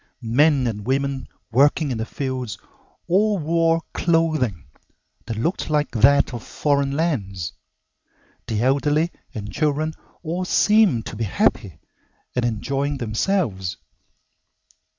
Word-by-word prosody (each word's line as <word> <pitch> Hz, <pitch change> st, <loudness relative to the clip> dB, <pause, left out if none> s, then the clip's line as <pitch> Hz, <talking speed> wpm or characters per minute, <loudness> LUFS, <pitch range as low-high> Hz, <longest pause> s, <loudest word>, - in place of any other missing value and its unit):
Men 135 Hz, +4 st, +3 dB
and 105 Hz, -2 st, -3 dB
women 135 Hz, 0 st, -1 dB, 0.2 s
working 140 Hz, +4 st, +3 dB
in 115 Hz, -, -2 dB
the 110 Hz, -, -3 dB
fields 130 Hz, -6 st, -4 dB, 0.5 s
all 205 Hz, +4 st, +3 dB
wore 165 Hz, 0 st, +1 dB
clothing 155 Hz, -, +1 dB, 0.6 s
that 115 Hz, -, -4 dB
looked 165 Hz, -, -1 dB
like 150 Hz, -1 st, +1 dB
that 135 Hz, +4 st, +4 dB
of 120 Hz, -, -5 dB
foreign 140 Hz, +1 st, 0 dB
lands. 100 Hz, -, -2 dB, 0.9 s
The 110 Hz, -1 st, -1 dB
elderly 145 Hz, +5 st, +2 dB, 0.2 s
and 105 Hz, -1 st, -6 dB
children 155 Hz, +1 st, 0 dB, 0.3 s
all 175 Hz, +3 st, -2 dB
seemed 205 Hz, -, +3 dB
to -, -, -6 dB
be 115 Hz, +1 st, -2 dB
happy 95 Hz, -3 st, 0 dB, 0.6 s
and 125 Hz, -, +1 dB
enjoying 135 Hz, +5 st, -1 dB
themselves. 110 Hz, -, -1 dB
140 Hz, 115 wpm, -22 LUFS, 115-160 Hz, 0.9 s, that